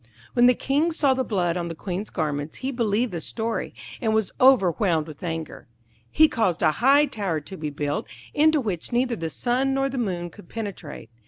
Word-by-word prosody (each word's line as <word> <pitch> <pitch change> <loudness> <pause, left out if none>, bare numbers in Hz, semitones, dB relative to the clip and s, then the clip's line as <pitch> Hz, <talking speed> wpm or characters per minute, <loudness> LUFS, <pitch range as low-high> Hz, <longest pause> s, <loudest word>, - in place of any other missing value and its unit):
When 240 0 +5
the 250 - +5
King 290 +7 +1
saw 290 -4 +2
the 260 0 0
blood 180 -7 0
on 170 -1 -2
the 165 - -5
Queen's 190 +4 -4
garments 150 -2 -3
he 270 - 0
believed 235 -1 0
the 170 -2 -4
story, 225 +6 -3 0.3
and 220 -3 +1
was 220 -4 0
overwhelmed 190 -9 +4
with 155 -3 -11
anger. 165 -5 -5 0.4
He 315 - +5
caused 205 - 0
a - - +5
high 275 - +4
tower 200 - -2
to 190 +6 -9
be 155 -3 -4
built, 145 0 -3 0.3
into 310 +1 +4
which 200 - -3
neither 245 0 +1
the 165 -5 -4
sun 255 +7 0
nor 270 0 +1
the 265 -1 -3
moon 175 -6 -2
could 190 -1 -15
penetrate. 200 - -7
210 Hz, 195 wpm, -24 LUFS, 170-255 Hz, 0.4 s, When